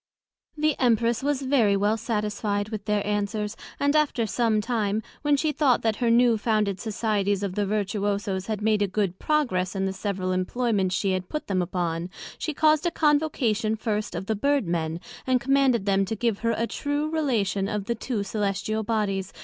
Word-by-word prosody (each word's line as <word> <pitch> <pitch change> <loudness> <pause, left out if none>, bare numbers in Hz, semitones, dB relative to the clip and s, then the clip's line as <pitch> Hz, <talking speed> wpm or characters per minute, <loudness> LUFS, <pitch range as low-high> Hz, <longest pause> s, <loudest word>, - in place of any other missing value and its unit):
The 305 -1 +2
Empress 235 -2 +2
was 280 0 0
very 240 -7 +3
well 205 +2 +2
satisfied 210 -2 -2
with 215 -2 -5
their 210 -1 0
answers; 210 +1 -1 0.2
and 285 +1 +2
after 290 -6 +2
some 220 0 +1
time, 215 -2 -1 0.2
when 290 -1 +3
she 310 +2 +1
thought 275 -4 +2
that 220 -2 +1
her 240 - +1
new 235 -1 +4
founded 210 -3 0
societies 205 -2 0
of 195 -2 -2
the 205 0 -1
Vertuoso's 200 -2 -1
had 215 -2 -3
made 215 -1 +2
a 205 - +3
good 190 -2 -1
progress 210 -12 0
in 195 0 0
the 190 - -1
several 190 -1 -2
Employments 190 0 0
she 195 - 0
had 185 -1 -2
put 305 - -4
them 185 -2 0
upon, 175 -1 -2 0.3
she 315 - -2
caused 310 +2 +3
a - - +3
Convocation 285 -9 +1
first 215 -3 -2
of 175 +3 -4
the 220 - 0
Bird 280 +2 +1
men, 165 -1 -1 0.3
and 255 -1 +3
commanded 260 -4 +2
them 195 -1 +3
to 220 - -3
give 225 -1 0
her 230 -1 0
a 230 - +1
true 290 +4 -2
relation 220 -11 0
of 210 -1 -3
the 235 - 0
two 235 -1 -3
Cœlestial 205 +1 -1
Bodies, 205 -3 -1
viz. - - -17
215 Hz, 190 wpm, -25 LUFS, 200-245 Hz, 0.3 s, new